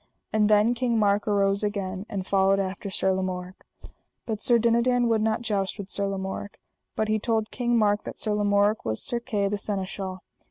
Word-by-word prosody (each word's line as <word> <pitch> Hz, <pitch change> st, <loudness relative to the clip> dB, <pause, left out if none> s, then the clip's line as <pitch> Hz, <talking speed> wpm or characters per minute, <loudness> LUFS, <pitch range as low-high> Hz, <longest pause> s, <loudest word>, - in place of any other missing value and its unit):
And 215 Hz, -1 st, +3 dB
then 210 Hz, +3 st, +4 dB
King 240 Hz, -1 st, 0 dB
Mark 205 Hz, -1 st, +2 dB
arose 200 Hz, 0 st, +2 dB
again, 200 Hz, -1 st, -3 dB
and 195 Hz, -4 st, -4 dB
followed 195 Hz, 0 st, +3 dB
after 195 Hz, +1 st, -3 dB
Sir 190 Hz, 0 st, 0 dB
Lamorak. 185 Hz, 0 st, -4 dB, 0.6 s
But 220 Hz, -2 st, -3 dB
Sir 240 Hz, -2 st, +4 dB
Dinadan 235 Hz, +2 st, +2 dB
would 225 Hz, -1 st, +2 dB
not 220 Hz, +1 st, 0 dB
joust 200 Hz, -4 st, -1 dB
with 200 Hz, -1 st, -7 dB
Sir 200 Hz, 0 st, 0 dB
Lamorak, 195 Hz, +1 st, -5 dB, 0.4 s
but 220 Hz, -, 0 dB
he 215 Hz, 0 st, +1 dB
told 220 Hz, -1 st, -1 dB
King 240 Hz, -1 st, 0 dB
Mark 210 Hz, -1 st, +2 dB
that -, -, -7 dB
Sir 215 Hz, -, -1 dB
Lamorak 205 Hz, 0 st, +2 dB
was 110 Hz, 0 st, -1 dB
Sir 240 Hz, -, 0 dB
Kay, 210 Hz, -5 st, -1 dB
the 205 Hz, +1 st, -2 dB
Seneschal. 190 Hz, -2 st, -4 dB
205 Hz, 190 wpm, -26 LUFS, 195-220 Hz, 0.6 s, then